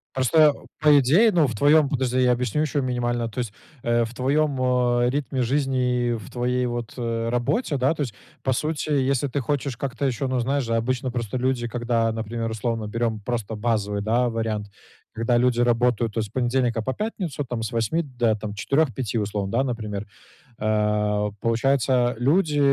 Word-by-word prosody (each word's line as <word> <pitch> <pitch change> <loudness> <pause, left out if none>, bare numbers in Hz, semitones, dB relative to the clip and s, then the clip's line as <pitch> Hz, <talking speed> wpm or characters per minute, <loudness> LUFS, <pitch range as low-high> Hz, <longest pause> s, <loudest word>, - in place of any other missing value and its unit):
Просто, 130 +4 +2
а 145 - -6 0.2
по 150 -1 +7
идее, 170 - +4
ну, 170 -5 +4
в 120 - -4
твоём 145 +6 +5
подожди, 130 -2 0
я 125 -1 +4
объясню 125 +3 0
ещё 145 -2 0
минимально. 120 -2 -1
То 115 - -6
есть, 115 -4 -3 0.3
э, 120 0 +2
в 115 - -9
твоем, 140 +2 +1
а, 125 -1 +2
ритме 135 -1 -2
жизни 125 -2 +1
и 120 - +1
в 110 -4 -6
твоей 125 +1 0
вот, 120 -1 -4
э, 115 -1 -2
работе, 140 - 0
да? 130 +4 +2
То 155 - -5
есть, 125 -7 -2 0.3
по 135 - +1
сути, 155 +4 -2
если 140 -1 +1
ты 140 +2 -2
хочешь 140 0 -2
как-то 135 +1 -3
ещё 135 +1 -1
Ну, 130 -1 0
знаешь 135 +3 0
же, 115 -1 -1
обычно 125 +2 -1
просто 120 0 -3
люди, 125 -1 0
когда, 120 -1 0
например, 115 +1 -3
условно 110 0 -2
берем 115 0 -1
просто 110 0 -3
базовый, 105 -2 -1
да, 120 +4 +1
вариант, 110 -2 -2 0.5
когда 115 +2 +1
люди 125 0 +2
работают 120 -2 +2
то 115 - 0
с 105 - -5
понедельника 120 -1 0
по 130 - -2
пятницу, 185 -8 -3
там, 120 -2 -4
с 110 - -3
8 115 +8 0
до, 120 -6 0
там, 105 -1 -6
4-5, 130 0 0
условно, 105 -2 -2
да? 120 +3 +2
Например. 105 -5 -4 0.6
А, 105 -1 +1
получается, 125 +1 +2
люди, 150 +3 +2
120 Hz, 185 wpm, -24 LUFS, 115-135 Hz, 0.6 s, по